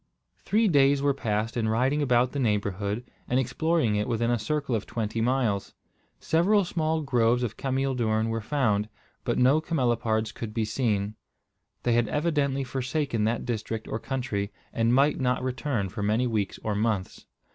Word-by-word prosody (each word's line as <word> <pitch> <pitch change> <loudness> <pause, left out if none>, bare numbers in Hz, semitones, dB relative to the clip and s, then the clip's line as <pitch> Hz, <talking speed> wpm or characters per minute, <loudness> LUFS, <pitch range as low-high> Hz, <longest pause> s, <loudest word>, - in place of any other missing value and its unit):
Three 220 +1 +2
days 140 -4 +4
were 140 0 +2
passed 110 -2 -2
in 110 -2 0
riding 130 +6 +1
about 125 -2 +3
the 145 - -3
neighbourhood, 105 -1 -1 0.2
and 125 - +2
exploring 130 -1 +1
it 105 - -1
within 115 0 0
a 120 - +1
circle 140 +4 -2
of 110 - -1
twenty 115 0 -2
miles. 115 -5 0 0.4
Several 195 +5 +3
small 160 -2 -1
groves 120 -2 +2
of 115 -2 -3
cameel 135 0 -1
doorn 110 -2 +1
were 115 0 -2
found, 110 -5 0 0.3
but - - -1
no 135 +5 +4
camelopards 120 -8 0
could 110 -2 -6
be 115 -2 +1
seen. 105 -3 0 0.7
They 120 - +2
had 120 -1 +3
evidently 145 -2 0
forsaken 130 -3 -1
that 115 +1 -1
district 115 -1 -3
or 110 - -3
country, 110 -6 -3 0.2
and 115 0 +2
might 140 +4 +3
not 125 -1 0
return 130 -4 -1
for 105 +3 -6
many 110 +5 +1
weeks 110 -5 -1
or 110 - -1
months. 105 -2 -2
120 Hz, 170 wpm, -27 LUFS, 110-135 Hz, 0.7 s, days